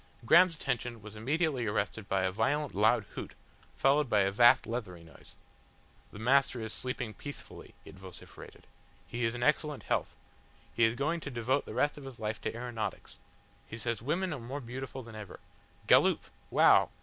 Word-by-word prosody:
Graham's 170 +6 +6
attention 120 -6 -3
was 110 0 -10
immediately 135 +1 0
arrested 105 0 -2
by 95 -1 +1
a 95 - +1
violent, 140 +8 0
loud - - +3
hoot, - - -7 0.4
followed 140 0 +3
by 105 -3 +4
a 95 0 +2
vast 120 +4 +6
leathery 100 -8 -5
voice. 80 -2 -16 0.8
"The - - -11
Master 130 +3 +2
is 110 -1 -5
sleeping 125 -2 -4
peacefully," 145 +5 -10
it 95 - -13
vociferated. 95 -2 -12 0.4
"He 120 0 -3
is 115 +1 -1
in 120 - -3
excellent 150 0 +1
health. - - -1 0.6
He 115 - +4
is 115 +1 +1
going 150 +6 -1
to 150 - -6
devote 125 +2 -1
the - - -7
rest 145 0 +1
of 140 - -11
his 135 -3 -9
life 110 0 -4
to - - -3
aeronautics. 120 -2 -5 0.5
He 110 - -7
says 115 -2 -3
women 170 +7 -1
are 145 - -5
more 125 +5 -6
beautiful 130 +1 -7
than 115 -1 -12
ever. 105 -3 -9 0.5
Galloop! - - +4 0.2
Wow! - - +5
120 Hz, 175 wpm, -31 LUFS, 110-140 Hz, 0.8 s, Graham's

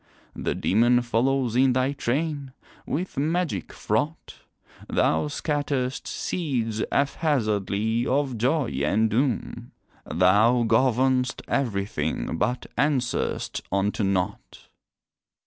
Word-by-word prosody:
The - - -2
demon 120 +4 +3
follows 120 +1 +1
in 130 0 +4
thy 130 +2 +1
train, 140 0 -2 0.3
with 165 -1 -3
magic 165 +4 -1
fraught, 155 +2 -2 0.5
Thou 80 - +2
scatter'st 145 -3 -2
seeds 120 -10 -2
haphazardly 115 - 0
of 135 -1 0
joy 130 +5 +1
and 110 +8 +2
doom, 120 -1 -1 0.3
Thou 105 +8 +4
govern'st 125 +2 +2
everything, 100 - -2
but 125 0 0
answer'st 130 -4 0
unto 100 +3 0
nought. 95 -2 -2
125 Hz, 95 wpm, -25 LUFS, 110-140 Hz, 0.5 s, in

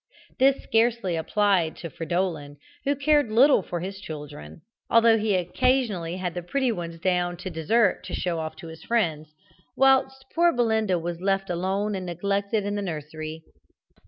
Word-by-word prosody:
This 270 +1 +3
scarcely 225 -5 +1
applied 180 0 +1
to 170 - -8
Fridolin, 165 -4 -3 0.3
who 285 +1 +2
cared 290 -2 +2
little 255 +2 +5
for 175 -2 -5
his 195 +2 -6
children, 145 - -9 0.3
although 230 -1 +5
he 210 -2 +1
occasionally 185 -2 0
had 180 -2 -3
the 175 - -4
pretty 255 +8 0
ones 170 -5 -5
down 175 0 0
to 180 +1 -6
dessert 185 +6 +1
to - - -4
show 170 -2 -2
off 160 0 -5
to 170 - -10
his 160 0 -11
friends, 155 -9 -1 0.4
whilst 265 0 +3
poor 340 +1 +4
Belinda 220 - +1
was 170 0 -5
left 195 0 0
alone 190 +4 -1
and 185 -2 -4
neglected 200 +4 -1
in 205 - -2
the 205 - -2
nursery. 155 -2 -6
190 Hz, 160 wpm, -25 LUFS, 170-225 Hz, 0.4 s, little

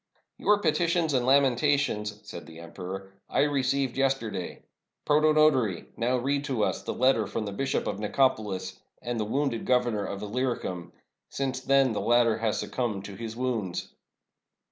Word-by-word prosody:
" - - -56
Your 210 - +4
petitions 170 -3 +1
and 125 -1 +1
lamentations," 135 -5 +2
said - - -9
the 80 -1 -12
emperor, 95 +3 -7
" - - -49
I - - +2
received 135 -2 +1
yesterday. 135 -9 -1 0.4
Protonotary, 150 - +3
now 125 +2 +1
read 140 +3 0
to 130 -7 0
us - - -1
the - - -4
letter 125 -4 +2
from 105 +2 -3
the 100 - -4
Bishop 135 +7 -1
of - - -2
NicopoUs 105 -3 0 0.2
and 120 -1 -2
the 105 - 0
wounded 130 0 -1
Governor 120 -5 +1
of 100 0 -5
lUyricum 105 -6 -3 0.2
— - - -59
since 135 -1 -1
then 135 -1 +3
the - - -2
latter 115 -1 +3
has 110 -1 0
suc - - -4
cumbed 110 -6 -2
to 100 - -8
his 115 +2 -6
wounds." 115 -7 -2
125 Hz, 165 wpm, -27 LUFS, 105-135 Hz, 0.4 s, Your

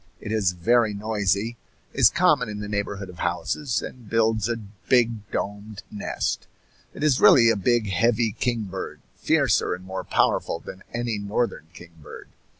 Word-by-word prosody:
It 105 - -6
is 100 -5 +1
very 110 +4 +2
noisy, 105 +1 -1 0.4
is - - +6
common 125 -3 +2
in 105 - -5
the 105 - -5
neighborhood 100 -1 -3
of 90 -2 -12
houses, 125 - -1
and 120 -5 -9
builds 110 -1 +1
a 120 - -1
big 110 +1 0
domed 105 +1 -5
nest. 105 - -3 0.5
It - - -5
is 145 -4 +3
really 115 -3 +7
a - - +1
big, 110 +2 +1
heavy 115 +1 +2
kingbird, 105 -4 -3
fiercer - - +2
and 90 - -13
more 95 0 -5
powerful - - +1
than 95 - -10
any 120 -3 -2
northern 100 -4 -2
kingbird. 85 -4 -12
105 Hz, 150 wpm, -24 LUFS, 100-115 Hz, 0.5 s, really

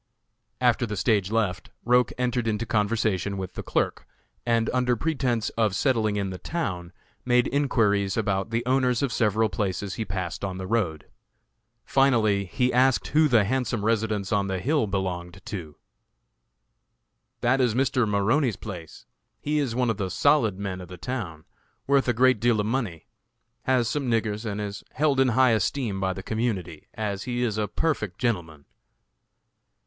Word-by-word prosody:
After 120 -1 +2
the 105 -1 -4
stage 100 -2 +2
left, 105 -5 -1 0.2
Roch 125 +1 +4
entered 125 -1 0
into 110 +1 -1
conversation 105 -2 0
with 95 -1 -5
the - - -5
clerk, - - -1 0.4
and, 115 -1 +2
under 125 -1 +2
pretense 125 -4 -1
of 110 -4 0
settling 110 -4 +1
in 100 -2 -2
the 90 - -7
town, 90 - -3 0.3
made 125 -1 +3
enquiries 105 -8 +1
about 95 -2 0
the 115 +1 -1
owners 125 -1 +2
of 130 -4 0
several 110 0 +2
places 95 0 -2
he 115 - -3
passed 95 -4 -4
on 95 -2 -3
the 95 - -5
road. 95 -9 -1 0.8
Finally 110 -7 +3
he 125 +8 0
asked 130 +1 +3
who 155 +1 +4
the 120 -6 +4
handsome 120 -1 -1
residence 110 -2 0
on 100 -3 +1
the 95 -1 -1
hill 140 - +1
belonged 90 -2 -3
to. 80 -8 -6 1.7
"That 130 +3 +3
is 120 -4 +2
Mr. 125 -3 +1
Maroney's 110 +4 +2
place. 90 -7 -9 0.3
He 150 +1 0
is 130 -6 -1
one 125 -2 +2
of 105 - -4
the 95 -1 -2
'solid' 110 +1 +2
men 95 -2 -4
of 90 - -9
the 90 +1 -10
town; 90 -8 -5 0.4
worth 140 -1 +3
a 120 - +3
great 130 0 +4
deal 115 0 +2
of 105 - 0
money; 110 -9 -2 0.6
has 125 -3 +2
some 140 -1 -1
niggers, 110 -1 -1
and 105 0 -4
is 100 -1 -5
held 145 -1 +2
in 135 - +5
high 130 +1 +4
esteem 110 -1 0
by 95 -1 0
the 95 - -8
community, 100 -9 -3
as 100 -3 -3
he 120 0 -1
is 110 -3 -1
a 105 - 0
perfect 110 - -2
gentleman." 85 - -2
110 Hz, 165 wpm, -26 LUFS, 95-125 Hz, 1.7 s, in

